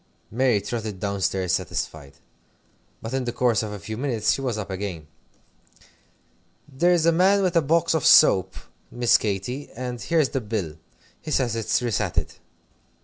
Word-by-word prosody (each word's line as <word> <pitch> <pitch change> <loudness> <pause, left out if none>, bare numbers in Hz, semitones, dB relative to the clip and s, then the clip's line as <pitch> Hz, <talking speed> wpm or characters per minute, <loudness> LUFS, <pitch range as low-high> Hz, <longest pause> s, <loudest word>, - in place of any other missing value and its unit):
Mary 125 -2 +2
trotted 105 -1 -5
down 100 0 -3
stairs 95 -1 0
satisfied. 80 -6 -4 0.9
But 115 +3 -5
in 130 -1 -1
the 120 - -2
course 120 -3 +1
of 110 -2 -5
a 105 - -6
few 110 +2 -7
minutes 120 -5 0
she - - -4
was 125 -5 -2
up 100 -2 -5
again. 95 -5 -5 1.6
"There's 170 +4 +2
a 170 - +5
man 185 +4 +4
come 200 - 0
with 180 -1 0
a 165 - +5
box 165 +4 +1
of 160 -4 0
soap, 95 -1 +5 0.3
Miss 120 -1 +2
Katy, 110 +7 -4
and 125 -1 -5
here's 155 +3 +1
the 135 - -2
bill. 100 -8 -4 0.4
He - - -8
says 125 -6 0
it's 115 +2 0
resated." 120 -6 -1
115 Hz, 165 wpm, -24 LUFS, 100-135 Hz, 1.6 s, a